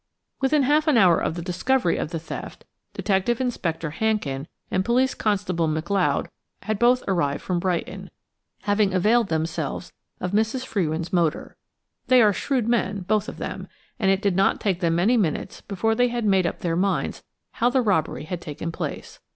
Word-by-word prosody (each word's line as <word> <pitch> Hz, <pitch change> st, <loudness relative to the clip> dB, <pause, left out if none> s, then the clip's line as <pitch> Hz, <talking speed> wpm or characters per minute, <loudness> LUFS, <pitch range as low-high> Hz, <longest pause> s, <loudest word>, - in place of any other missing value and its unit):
Within 275 Hz, +2 st, +3 dB
half 300 Hz, +4 st, +2 dB
an 295 Hz, -6 st, +4 dB
hour 180 Hz, -6 st, +5 dB
of -, -, -2 dB
the 170 Hz, -, -5 dB
discovery 185 Hz, +3 st, +1 dB
of -, -, -2 dB
the 165 Hz, -, -3 dB
theft, 160 Hz, -, -8 dB, 0.3 s
Detective 200 Hz, +4 st, 0 dB
Inspector 170 Hz, -10 st, -2 dB
Hankin 155 Hz, -6 st, -1 dB, 0.2 s
and 185 Hz, -, +1 dB
Police 255 Hz, +4 st, +2 dB
Constable 185 Hz, -6 st, 0 dB
McLeod 170 Hz, +5 st, 0 dB, 0.4 s
had 215 Hz, -1 st, -2 dB
both 245 Hz, +1 st, +4 dB
arrived 160 Hz, -7 st, 0 dB
from 180 Hz, -2 st, -1 dB
Brighton, 180 Hz, -1 st, -3 dB, 0.5 s
having 205 Hz, -2 st, +2 dB
availed 220 Hz, +5 st, +3 dB
themselves 160 Hz, 0 st, -3 dB, 0.3 s
of 180 Hz, -, -3 dB
Mrs. 225 Hz, +5 st, 0 dB
Frewin's 170 Hz, -6 st, -2 dB
motor. 170 Hz, -4 st, 0 dB, 0.5 s
They 255 Hz, -1 st, +6 dB
are 210 Hz, -1 st, +4 dB
shrewd 250 Hz, +1 st, -1 dB
men, 205 Hz, -4 st, 0 dB
both 210 Hz, +3 st, 0 dB
of -, -, -9 dB
them, -, -, -5 dB, 0.3 s
and 195 Hz, -4 st, +2 dB
it 195 Hz, +1 st, +2 dB
did 200 Hz, -3 st, +2 dB
not 195 Hz, +1 st, +2 dB
take 190 Hz, -4 st, 0 dB
them 165 Hz, -2 st, +1 dB
many 210 Hz, +9 st, +3 dB
minutes 175 Hz, -9 st, -1 dB
before 210 Hz, +3 st, -1 dB
they 245 Hz, +2 st, +3 dB
had 240 Hz, -2 st, -2 dB
made 190 Hz, -3 st, +3 dB
up -, -, -5 dB
their 165 Hz, -2 st, 0 dB
minds 195 Hz, +3 st, -1 dB, 0.3 s
how 240 Hz, -, +1 dB
the 255 Hz, 0 st, +2 dB
robbery 185 Hz, -10 st, 0 dB
had 170 Hz, +2 st, -5 dB
taken 155 Hz, +2 st, -5 dB
place. -, -, -6 dB
195 Hz, 175 wpm, -24 LUFS, 170-230 Hz, 0.5 s, They